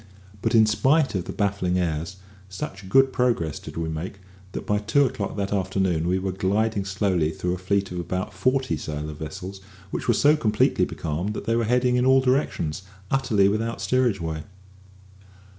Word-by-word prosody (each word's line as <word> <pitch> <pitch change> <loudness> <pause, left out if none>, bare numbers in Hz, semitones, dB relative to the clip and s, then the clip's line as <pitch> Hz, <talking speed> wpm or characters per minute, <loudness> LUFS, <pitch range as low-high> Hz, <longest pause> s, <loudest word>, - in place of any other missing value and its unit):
But, 115 0 +1
in 110 -1 +7
spite 135 +7 +3
of 90 -3 -2
the - - -5
baffling 100 -3 0
airs, 85 0 -2 0.3
such 95 0 -6
good 135 +3 +5
progress 115 - 0
did - - -10
we 80 -1 -1
make, 80 +5 -5 0.3
that - - -5
by 105 0 +1
two 110 +7 +3
o'clock 105 -5 -3
that 100 0 -1
afternoon 95 -4 0
we 90 +1 +2
were 95 0 -2
gliding 100 +2 0
slowly 95 -5 +1
through 90 +3 -2
a 90 - -4
fleet 100 +1 0
of 90 - -4
about 90 +4 -3
forty 130 +7 +1
sail 75 0 -5
of 75 - -10
vessels 95 +5 -7 0.3
which - - -4
were 120 - +4
so 145 +6 +5
completely 110 -8 +2
becalmed 85 +7 -3
that - - -5
they 115 - +1
were 115 -1 +1
heading 125 +2 +2
in 125 - +2
all 130 0 +6
directions, 125 - 0 0.3
utterly 115 -7 +3
without 110 +2 -1
steerage 115 +1 +1
way. 80 -2 -3
100 Hz, 185 wpm, -24 LUFS, 90-115 Hz, 0.3 s, in